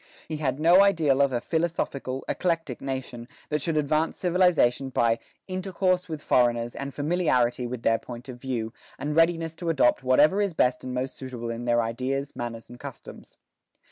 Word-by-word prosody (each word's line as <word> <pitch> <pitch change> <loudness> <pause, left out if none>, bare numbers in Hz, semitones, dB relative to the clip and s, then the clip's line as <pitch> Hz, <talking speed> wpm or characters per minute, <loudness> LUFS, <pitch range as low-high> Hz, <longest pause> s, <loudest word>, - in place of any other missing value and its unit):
He 155 - -4
had 135 -2 -1
no 170 +4 +6
ideal 160 -9 +3
of 140 -1 +3
a 120 - 0
philosophical, 140 -4 -2
eclectic 165 -8 -1
nation, 130 -3 -5 0.2
that 150 -1 0
should 160 +1 -1
advance 155 +2 +1
civilization 175 -8 +2
by 115 -2 +2 0.3
"intercourse 185 -1 -1
with 155 -2 -5
foreigners 120 -1 +2
and 140 0 -5
familiarity 130 -6 +1
with 120 -1 -6
their 115 0 +3
point 120 0 -9
of 125 -2 -9
view, 120 -4 -3 0.2
and 150 +1 -3
readiness 165 -1 +2
to 170 - -3
adopt 135 -7 +3
whatever 145 +9 +4
is 200 -5 -1
best 125 -3 +2
and 130 0 -5
most 130 +1 -3
suitable 125 -3 -6
in 115 +1 -5
their 120 -1 +3
ideas, 130 +5 -3
manners, 115 -1 -6
and 120 0 -12
customs." - - -11
135 Hz, 170 wpm, -26 LUFS, 120-165 Hz, 0.3 s, no